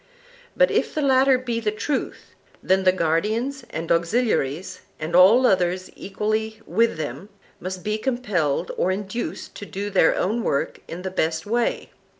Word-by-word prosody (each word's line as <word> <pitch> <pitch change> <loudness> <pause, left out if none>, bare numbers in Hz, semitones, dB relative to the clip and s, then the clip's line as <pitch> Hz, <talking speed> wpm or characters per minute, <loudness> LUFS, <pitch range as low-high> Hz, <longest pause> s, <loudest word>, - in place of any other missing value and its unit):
But - - +4
if - - 0
the 305 - 0
latter 265 -1 +4
be 240 -2 -3
the 220 -2 0
truth, 260 +6 -4 0.3
then 190 0 +2
the 185 - +7
guardians 215 - -1
and 165 +1 -4
auxiliaries, 170 - 0 0.2
and 155 +2 -3
all 205 +8 +7
others 185 -3 +1
equally 215 +2 -2
with 225 +3 +1
them, 150 +5 -5 0.3
must 185 0 -6
be 215 +1 -1
compelled 205 - -1
or 180 - +1
induced 205 +4 -4
to 205 - -7
do 205 +2 -4
their 185 -4 +4
own 220 +6 0
work 140 -9 -1
in 175 +2 -7
the 190 - -3
best 160 -3 -1
way. 235 +3 -1
200 Hz, 155 wpm, -23 LUFS, 175-230 Hz, 0.3 s, the